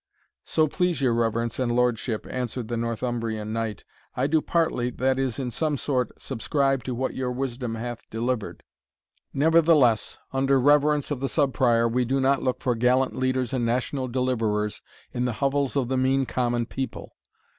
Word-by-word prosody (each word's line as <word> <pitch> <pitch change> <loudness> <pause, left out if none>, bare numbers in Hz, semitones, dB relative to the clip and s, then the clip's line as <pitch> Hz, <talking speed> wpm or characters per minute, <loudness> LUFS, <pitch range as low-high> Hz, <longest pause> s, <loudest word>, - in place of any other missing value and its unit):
"So 155 -1 +2
please 180 0 0
your 130 -4 +2
reverence 115 0 0
and 125 -2 +1
lordship," 120 -2 0
answered 125 -2 -4
the 120 - -1
Northumbrian 115 -2 -2
knight, 115 -2 -3 0.3
"I 125 - +1
do 155 +2 +2
partly, 160 -9 0
that 130 +2 0
is, 130 -4 -1
in 130 -3 -3
some 150 +4 -1
sort, 130 -2 -2
subscribe 135 +1 0
to 125 - -3
what 130 +2 -2
your 130 -1 -2
wisdom 125 -2 -3
hath 120 +1 -6
delivered 115 0 -3 0.7
Nevertheless, 155 -6 +3 0.2
under 135 0 +3
reverence 145 +2 +3
of 140 - -1
the 135 0 -1
Sub 140 -4 +1
Prior, 115 -2 +3
we 125 +2 +1
do 135 +3 0
not 135 +1 +2
look 130 -1 -1
for 125 - +1
gallant 125 +3 +2
leaders 130 -1 0
and 125 -2 0
national 130 +3 -1
deliverers 115 -5 -1 0.3
in 125 0 -1
the 125 - -1
hovels 140 +2 0
of 135 -4 +1
the 130 +1 0
mean 135 +1 +2
common 120 -2 0
people. 130 +2 -6
125 Hz, 170 wpm, -25 LUFS, 120-135 Hz, 0.7 s, Nevertheless